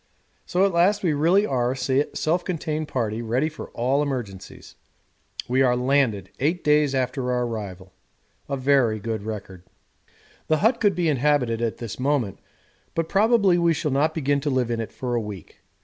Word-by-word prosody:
So 185 +2 +2
at 195 - 0
last 185 +5 +3
we 165 -4 +2
really 170 +8 +3
are 125 -6 0
a - - -7 0.4
self 170 +3 0
contained 155 -3 -3
party 115 -5 -2
ready 125 +7 0
for 155 - -9
all 130 +4 +1
emergencies. 120 -10 -5 0.7
We 130 +2 +2
are 125 -2 +4
LANDED 125 -7 +1
eight 165 +6 0
days 150 -2 +3
after 130 0 -1
our 125 0 0
arrival 100 -5 -6 0.6
a 140 - -1
very 130 -5 +2
good 110 0 -3
record. 100 -4 -7 0.9
The 155 - +3
hut 225 +8 +2
could 205 -4 +2
be 175 -1 0
inhabited 135 -5 +1
at 115 -2 -1
this 115 -1 -7
moment, 130 -7 0 0.6
but 165 -1 -1
probably 200 -3 +3
we 170 -1 +3
shall 150 - -2
not 150 +4 +1
begin 145 -2 +1
to 145 +1 -2
live 130 -3 0
in 115 - -1
it 115 - -4
for 125 -2 -4
a 120 - +1
week. 105 -6 -9
135 Hz, 180 wpm, -24 LUFS, 115-155 Hz, 0.9 s, are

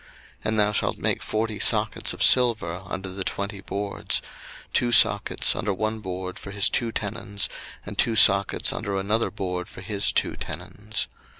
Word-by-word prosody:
02:026:019 - - -22 0.4
And 110 0 +1
thou 105 0 +3
shalt 105 - -1
make - - 0
forty 110 -1 -2
sockets 110 -1 +2
of - - -1
silver 110 -9 +4
under 95 +1 -5
the 95 +1 -4
twenty 100 +1 -4
boards; 100 +2 -3 0.5
two 120 -1 +1
sockets - - +4
under 100 -2 -2
one 110 +2 -2
board 95 -2 -6
for - - -9
his 100 0 +3
two 115 -1 0
tenons, 100 -1 -3 0.4
and 105 0 -8
two 115 - +2
sockets 100 -2 +4
under 100 -3 -3
another 105 +4 0
board 90 -2 -4
for - - -11
his 100 +1 0
two - - 0
tenons. 105 +1 -4
100 Hz, 170 wpm, -24 LUFS, 95-110 Hz, 0.5 s, silver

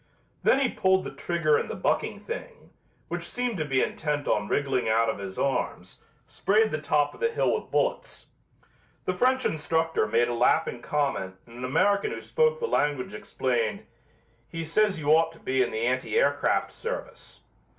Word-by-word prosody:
Then 270 - +4
he 275 - +3
pulled 190 -4 +2
the - - -7
trigger 155 +1 +1
and - - -4
the - - -4
bucking - - -1
thing, 480 0 -8 0.4
which - - -3
seemed 245 -4 -3
to 155 - -1
be 135 -3 +2
intent 150 -2 -2
on 105 0 +1
wriggling 130 -3 0
out 115 +1 +3
of - - -8
his 95 -1 -7
arms, 140 -1 -2 0.2
sprayed 215 +2 +2
the 155 - -2
top 145 -1 +1
of - - -15
the 465 - +2
hill - - +1
with - - -3
bullets. - - -1 0.8
The 185 - 0
French 255 +7 +2
instructor 160 -4 0
made 115 +3 +2
a 120 - -2
laughing 120 0 +2
comment 135 -12 -1
and 120 +1 -13
an 125 - -3
American 200 +9 +2
who - - -5
spoke 475 0 +1
the 470 - -1
language 145 - 0
explained, 115 +1 -2 0.6
"He 165 0 -4
says 190 +3 +1
you 145 -1 -2
ought 165 +1 +4
to 165 - -17
be 130 0 0
in 125 - +2
the 110 +1 -2
anti 130 - 0
aircraft - - +2
service." 470 +2 -7
150 Hz, 180 wpm, -27 LUFS, 125-205 Hz, 0.8 s, Then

